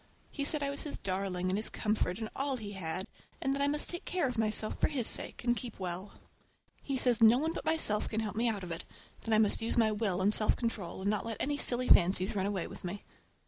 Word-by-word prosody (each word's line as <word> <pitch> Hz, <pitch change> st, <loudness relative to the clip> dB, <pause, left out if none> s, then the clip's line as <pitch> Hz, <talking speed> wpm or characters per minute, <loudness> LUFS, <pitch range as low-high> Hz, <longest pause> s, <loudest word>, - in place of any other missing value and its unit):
He 285 Hz, -, -3 dB
said 295 Hz, 0 st, +2 dB
I 280 Hz, -, -1 dB
was 280 Hz, -, -2 dB
his 295 Hz, -, -4 dB
darling 185 Hz, -1 st, -2 dB
and 190 Hz, -, +1 dB
his 220 Hz, -, -1 dB
comfort 210 Hz, -4 st, -1 dB
and 220 Hz, -1 st, -4 dB
all 275 Hz, -1 st, -1 dB
he 210 Hz, -3 st, -6 dB
had, 185 Hz, -1 st, -3 dB, 0.3 s
and 270 Hz, -, 0 dB
that 280 Hz, -, -2 dB
I 280 Hz, -, +3 dB
must 295 Hz, +1 st, +1 dB
take 345 Hz, -, -5 dB
care 360 Hz, -6 st, 0 dB
of 250 Hz, -, -3 dB
myself 215 Hz, -1 st, 0 dB
for -, -, +4 dB
his 265 Hz, -6 st, -1 dB
sake, -, -, +1 dB
and 240 Hz, 0 st, +2 dB
keep 240 Hz, -4 st, -7 dB
well. 185 Hz, +1 st, -4 dB, 0.7 s
He 275 Hz, -2 st, -2 dB
says 245 Hz, -3 st, +3 dB
no 225 Hz, +2 st, +8 dB
one 320 Hz, +4 st, -1 dB
but -, -, -6 dB
myself 315 Hz, -10 st, +1 dB
can 220 Hz, -, -1 dB
help 215 Hz, -2 st, -4 dB
me 235 Hz, +2 st, +2 dB
out 205 Hz, -4 st, -3 dB
of 175 Hz, -, -6 dB
it, 165 Hz, -, -4 dB, 0.4 s
that 225 Hz, -, -2 dB
I -, -, +5 dB
must 215 Hz, 0 st, +3 dB
use 225 Hz, -, -2 dB
my 220 Hz, -2 st, +4 dB
will 205 Hz, -4 st, 0 dB
and 200 Hz, +3 st, +3 dB
self 215 Hz, -, +4 dB
control 220 Hz, -6 st, -3 dB
and 200 Hz, -, 0 dB
not 210 Hz, -, -1 dB
let 225 Hz, -2 st, -3 dB
any 290 Hz, +1 st, 0 dB
silly 250 Hz, -1 st, 0 dB
fancies 185 Hz, +3 st, +4 dB
run 195 Hz, -1 st, 0 dB
away 195 Hz, -4 st, -1 dB
with -, -, -10 dB
me. 185 Hz, +3 st, -6 dB
220 Hz, 260 wpm, -32 LUFS, 195-255 Hz, 0.7 s, no